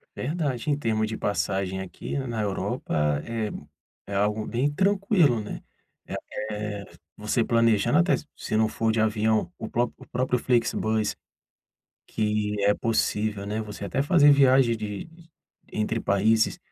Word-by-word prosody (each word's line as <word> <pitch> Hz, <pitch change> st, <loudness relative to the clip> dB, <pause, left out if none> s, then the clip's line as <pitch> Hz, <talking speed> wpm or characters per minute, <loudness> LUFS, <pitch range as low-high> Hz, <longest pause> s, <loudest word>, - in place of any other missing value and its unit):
Verdade, 145 Hz, -2 st, -2 dB
em 145 Hz, -, +2 dB
termos 110 Hz, -5 st, 0 dB
de 110 Hz, 0 st, -4 dB
passagem 95 Hz, -2 st, -1 dB
aqui 95 Hz, +8 st, -6 dB
na 120 Hz, -5 st, -3 dB
Europa 75 Hz, -7 st, -1 dB
é 115 Hz, -2 st, -3 dB, 0.5 s
é 100 Hz, -, -5 dB
algo 105 Hz, +2 st, +1 dB
bem 125 Hz, +5 st, 0 dB
tranquilo, 190 Hz, -, +2 dB
né. 105 Hz, -, -7 dB, 0.9 s
Eh, 105 Hz, -1 st, -4 dB, 0.3 s
você 105 Hz, +3 st, 0 dB
planejando 115 Hz, -, +3 dB
até 175 Hz, -, +4 dB, 0.2 s
se 110 Hz, -, -2 dB
não 110 Hz, 0 st, +3 dB
for 110 Hz, 0 st, 0 dB
de 110 Hz, -, 0 dB
avião, 110 Hz, -3 st, +1 dB
o 110 Hz, -, -6 dB
próprio 120 Hz, 0 st, -1 dB
o -, -, -12 dB
próprio 125 Hz, 0 st, 0 dB
Flixbus 110 Hz, -3 st, +1 dB, 0.9 s
que 105 Hz, -1 st, -1 dB
é 100 Hz, +1 st, +5 dB
possível, 110 Hz, -3 st, 0 dB
né. 105 Hz, +2 st, -2 dB
Você 105 Hz, -1 st, -7 dB
até 130 Hz, -, -1 dB
fazer 145 Hz, -1 st, +6 dB
viagem 130 Hz, -4 st, +5 dB
de 105 Hz, +3 st, -5 dB, 0.6 s
entre 110 Hz, +2 st, -1 dB
países 110 Hz, +3 st, +2 dB
110 Hz, 140 wpm, -26 LUFS, 105-125 Hz, 0.9 s, fazer